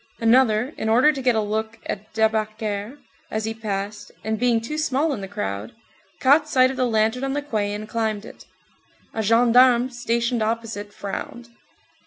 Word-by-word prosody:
Another, 235 +2 +3
in 220 - -2
order 250 +7 +5
to 270 - -5
get 250 -2 +2
a 220 - +2
look 220 +2 -3
at 210 +2 -5
Debacker 215 +1 -1 0.3
as 215 0 -2
he 220 - -2
passed, 205 -1 -5
and 220 0 -2
being 240 -1 +3
too 300 +7 -4
small 295 +1 +1
in 210 - -5
the 195 - -5
crowd, 105 - -4 0.5
caught 290 +3 +4
sight 255 -2 +4
of 265 - -7
the 255 -2 +2
lantern 225 +3 +1
on 270 0 -1
the 290 - -1
quay 210 -7 -1
and 210 +1 -5
climbed 220 -2 -2
it. - - -13 0.7
A 220 - -1
gendarme 240 +3 +5
stationed 235 0 -1
opposite 220 -2 -3
frowned. 235 +5 -6
225 Hz, 175 wpm, -23 LUFS, 215-250 Hz, 0.7 s, order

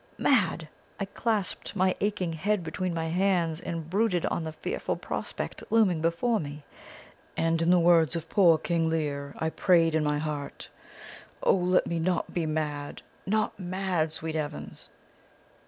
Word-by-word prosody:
Mad! 195 - +2 0.3
I 195 - -1
clasped 215 -1 -2
my 185 -1 +2
aching 190 -5 0
head 195 +4 0
between 175 +3 -3
my 165 -1 -2
hands, 175 -2 +1
and 165 -2 -4
brooded 190 -1 +1
on 170 - -1
the 160 - -4
fearful 155 - -3
prospect - - -5
looming 200 -8 +3
before 170 +8 +1
me, 145 0 -7 0.7
and 165 0 +1
in 165 - +2
the 180 - +6
words 170 -2 +4
of 165 -1 -4
poor 170 -5 +5
King 165 0 0
Lear, 145 -3 -2
I 160 0 -1
prayed 165 -3 +3
in 160 -1 +2
my 150 0 +1
heart: 150 -2 -5 0.7
"'O - - +5
let 180 -1 +2
me 170 - -2
not 175 +1 -1
be 170 -3 -1
mad, 150 -2 -3 0.2
not 215 +1 0
mad, 180 -3 -1
sweet 160 0 -4
heavens!' 150 -1 -5
165 Hz, 155 wpm, -28 LUFS, 160-185 Hz, 0.7 s, the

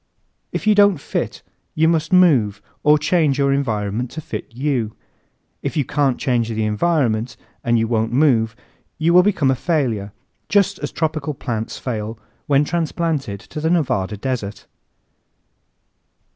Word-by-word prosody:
If - - -4
you 215 - +5
don't 205 -3 +5
fit 140 - -4 0.3
you 160 +1 +3
must 160 -1 +1
move 140 - +4 0.2
or 150 +1 +5
change 155 -2 +2
your 140 -1 +2
environment 115 -3 -1
to 160 - -7
fit - - -7
you. 125 -3 -1 0.7
If - - -3
you 145 - +1
can't 140 -1 +1
change 120 -3 0
the 110 -1 -1
environment 115 -2 0 0.3
and 120 0 +2
you 115 0 +1
won't 110 -1 0
move 120 -5 +3 0.4
you 165 +2 +2
will 180 - +8
become 180 -9 +2
a - - +1
failure, 120 - -1 0.4
just 200 -1 +2
as - - -4
tropical 155 -2 -2
plants 115 -3 -4
fail 110 -2 -4 0.3
when 140 0 +4
transplanted 160 - -2
to 150 - -8
the 160 - +1
Nevada 125 - 0
desert. 105 -4 -4
135 Hz, 145 wpm, -20 LUFS, 115-160 Hz, 0.7 s, will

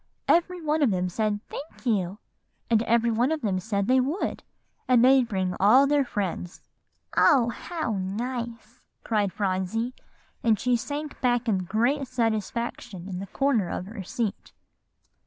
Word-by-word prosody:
"Every 355 +2 +3
one 305 +1 +1
of 280 - +4
them 185 -2 0
said 210 +2 -1
'Thank 290 -1 -9
you;' 200 -5 0 0.5
and 220 -1 +5
every 235 0 +2
one 240 +6 +1
of 320 -1 -1
them 195 -4 0
said 200 0 -1
they 260 +4 +4
would, 285 +9 -1 0.5
and 245 -1 +5
they'd 260 -2 +5
bring 190 -4 -1
all 240 +8 +6
their 290 0 +3
friends." 190 -7 -4 0.5
"Oh, 245 -5 +5
how 240 - -3
nice!" 230 +4 -5 0.2
cried 210 -4 0
Phronsie; 195 +5 -1 0.5
and 220 -3 +3
she 250 -1 +2
sank 290 +5 -5
back 245 -2 +1
in 190 -4 +1
great 250 +8 +1
satisfaction 225 -5 -2
in 185 -2 -5
the 195 - -6
corner 240 -4 +1
of 180 - -4
her 210 +1 -7
seat. 210 +3 -4
230 Hz, 155 wpm, -26 LUFS, 200-255 Hz, 0.5 s, all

